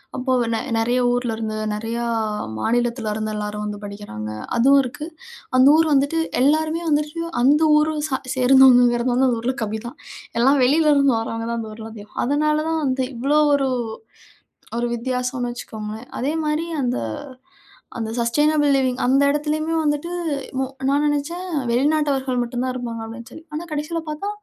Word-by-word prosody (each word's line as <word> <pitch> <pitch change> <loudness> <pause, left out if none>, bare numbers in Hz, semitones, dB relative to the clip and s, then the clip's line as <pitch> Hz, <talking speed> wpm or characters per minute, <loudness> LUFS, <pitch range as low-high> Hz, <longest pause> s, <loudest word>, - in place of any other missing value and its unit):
அப்போ 260 +1 -2 0.2
நெ 225 - 0 0.2
நிறைய 240 +3 +1
ஊரிலிருந்து 225 -3 -2 0.2
நிறையா 225 +2 -3 0.6
மாநிலத்தில 235 - 0
இருந்து, 215 0 -3
எல்லாரும் 210 0 -4
வந்து 210 -1 -5
படிக்கிறாங்க. 200 - -7 0.3
அதுவும் 275 +4 +6
இருக்கு. 265 +5 -6 0.5
அந்த 255 +1 +7
ஊர் 325 0 +3
வந்துட்டு 285 +4 +2 0.2
எல்லாருமே 315 +4 +2
வந்துட்டு 300 +2 0 0.2
அந்த 290 +4 +5 0.2
ஊரை 310 +1 +1
சா 265 - -1 0.2
சேர்ந்தவங்கங்கிறது 250 -2 +5
வந்து 260 +2 +3
அந்த 235 - 0
ஊரில 255 +3 -1
கம்மி 220 0 -3
தான். 240 - -10 0.4
எல்லாம் 270 +4 +4
வெளிலருந்து 285 -1 +4
வரவங்க 225 0 -4
தான் 235 - -2
அந்த 220 - -7
ஊரில 220 0 -9
அதிகம். 210 -1 -13
அதனாலதான் 305 +3 +1
வந்து 260 -1 0
இவ்வளோ 280 +6 +2 0.2
ஒரு 275 -1 +1 1.1
ஒரு 240 0 0
வித்தியாசம்னு 250 +1 -2
வச்சுக்கோங்களேன். 220 -1 -7
அதேமாரி 305 +3 -1 0.2
அந்த 250 -1 0 1.0
அந்த 225 -1 -3
சஸ்டெய்னபிள் 295 +5 +2
லிவிங் 260 -2 0
அந்த 265 +3 +4
இடத்துலேயுமே 305 +2 -1
வந்துட்டு 295 +3 -1 0.5
மு - - +1 0.3
நான் 285 +2 +2
நினச்சேன், 295 +5 -2 0.3
வெளிநாட்டவர்கள் 270 -1 +1
மட்டும் 240 +1 -3
தான் 255 0 -1
இருப்பாங்க, 235 -2 -5
அப்படின்னு 230 +1 -9
சொல்லி. 320 - -11
ஆனா 325 +3 -4
கடைசியில 305 +3 -2
பார்த்தா, 305 +7 -4
260 Hz, 145 wpm, -21 LUFS, 235-295 Hz, 1.1 s, அந்த